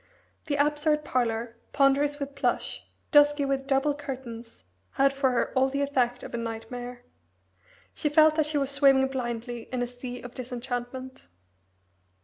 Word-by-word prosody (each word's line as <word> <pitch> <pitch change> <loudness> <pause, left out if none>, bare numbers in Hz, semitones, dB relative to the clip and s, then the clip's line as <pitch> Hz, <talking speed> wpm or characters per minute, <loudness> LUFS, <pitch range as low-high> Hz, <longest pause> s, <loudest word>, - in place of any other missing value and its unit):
The 290 - 0
absurd 300 +1 +1
parlour, 235 -3 -1 0.2
ponderous 280 +1 +3
with 280 -1 -5
plush, 275 - -1 0.2
dusky 290 -1 +5
with 270 0 -1
double 275 +2 +2
curtains, 255 -5 -8 0.3
had 275 0 +3
for 275 -1 +2
her 250 -2 0
all 265 +1 +3
the 280 +1 -1
effect 250 -3 0
of - - -8
a - - -1
nightmare. 245 +2 -6 0.9
She 300 - -1
felt 310 +1 +6
that 310 -1 +2
she 305 -1 0
was 275 -1 0
swimming 275 -1 +4
blindly 240 -2 -4
in 250 -1 -1
a - - -2
sea 245 0 -8
of 245 0 -9
disenchantment. 250 - -6
265 Hz, 150 wpm, -27 LUFS, 245-285 Hz, 0.9 s, felt